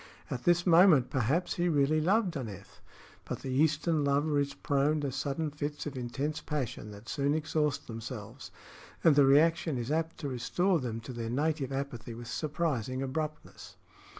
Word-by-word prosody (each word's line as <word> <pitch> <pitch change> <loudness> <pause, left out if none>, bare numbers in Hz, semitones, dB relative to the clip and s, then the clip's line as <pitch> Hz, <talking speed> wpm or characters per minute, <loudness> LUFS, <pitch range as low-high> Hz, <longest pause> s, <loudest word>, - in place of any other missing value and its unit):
At 125 - -4
this 175 0 +3
moment 170 -7 +6
perhaps 140 +8 0
he 175 0 +1
really 150 0 +2
loved 190 +2 +2
Aneth; 105 -8 -7 0.4
but - - -5
the 130 - -4
Eastern 155 +3 +2
lover 145 +1 +2
is 140 0 -1
prone 145 +2 +1
to 140 -2 -2
sudden 145 +3 -2
fits 150 0 -4
of 145 -2 -5
intense 135 +5 -3
passion 130 -7 -4
that 105 +2 -12
soon 145 +1 0
exhaust 155 -2 -1
themselves, 115 +1 -7 0.5
and 160 -3 +6
the 145 -1 +6
reaction 160 +1 +4
is 120 +3 -3
apt 160 +1 -1
to 145 - -2
restore 170 +9 +1
them 115 -4 -4
to 120 +3 -8
their 115 -1 -4
native 145 +1 -1
apathy 130 -4 -4
with 120 +1 -8
surprising 135 -3 -2
abruptness. 155 +3 -5
145 Hz, 165 wpm, -30 LUFS, 130-155 Hz, 0.5 s, moment